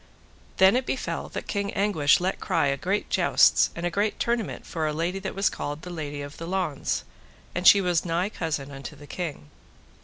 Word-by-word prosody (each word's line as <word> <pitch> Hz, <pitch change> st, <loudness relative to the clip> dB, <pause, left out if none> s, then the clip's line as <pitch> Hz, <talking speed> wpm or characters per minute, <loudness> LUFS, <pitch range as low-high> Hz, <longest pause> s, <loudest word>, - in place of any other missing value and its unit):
Then 190 Hz, +3 st, +6 dB
it 255 Hz, 0 st, 0 dB
befell 265 Hz, -, -3 dB
that -, -, -5 dB
King 200 Hz, -1 st, -2 dB
Anguish 180 Hz, -8 st, +3 dB
let 185 Hz, +2 st, -1 dB
cry -, -, +1 dB
a 140 Hz, -1 st, +1 dB
great 190 Hz, +9 st, -1 dB
jousts -, -, +4 dB
and 170 Hz, -, -4 dB
a 175 Hz, -, 0 dB
great 205 Hz, +4 st, 0 dB
tournament 235 Hz, -3 st, -1 dB
for 160 Hz, -3 st, -2 dB
a 150 Hz, -, -1 dB
lady 170 Hz, +5 st, -1 dB
that 190 Hz, 0 st, -5 dB
was 195 Hz, 0 st, +2 dB
called 145 Hz, +2 st, -4 dB
the 180 Hz, -, -7 dB
Lady 145 Hz, -4 st, -5 dB
of 145 Hz, +1 st, -9 dB
the 165 Hz, -, -6 dB
Launds, 180 Hz, -6 st, -1 dB, 0.5 s
and 175 Hz, +1 st, +1 dB
she 200 Hz, -, +9 dB
was 175 Hz, -3 st, +1 dB
nigh 175 Hz, +3 st, 0 dB
cousin 150 Hz, -8 st, -3 dB
unto 135 Hz, 0 st, -8 dB
the 145 Hz, -, -13 dB
king. 145 Hz, -, -6 dB
175 Hz, 205 wpm, -26 LUFS, 150-195 Hz, 0.5 s, she